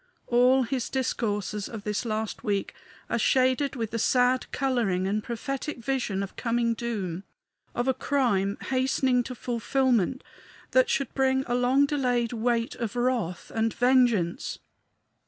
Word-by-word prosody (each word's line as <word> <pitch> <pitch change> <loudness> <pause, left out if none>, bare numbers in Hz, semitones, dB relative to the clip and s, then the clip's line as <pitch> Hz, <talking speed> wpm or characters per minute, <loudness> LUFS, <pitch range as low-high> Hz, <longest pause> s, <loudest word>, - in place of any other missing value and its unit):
All 250 +2 +4
his 245 0 -2
discourses 210 -6 -2
of 220 -3 -7
this 210 +3 -2
last 220 0 -3
week 200 -4 -1 0.3
are 235 - -1
shaded 260 +4 +2
with 225 -4 -3
the 230 - -2
sad 250 +3 +2
coloring 235 -9 0
and 210 +2 -1
prophetic 275 +5 -4
vision 235 -6 -1
of 195 - -8
coming 235 -1 0
doom, 200 -6 -4 0.5
of 240 +2 -1
a 265 - +3
crime 215 -9 0
hastening 260 -1 +2
to 255 +1 -6
fulfillment 250 0 0 0.5
that - - +4
should 275 - -1
bring 265 0 +2
a 240 - -2
long 250 +3 +3
delayed 250 -5 0
weight 235 0 0
of 230 -1 -4
wrath 240 -8 -1
and 225 0 0
vengeance. 245 -8 +2
240 Hz, 140 wpm, -27 LUFS, 220-260 Hz, 0.5 s, All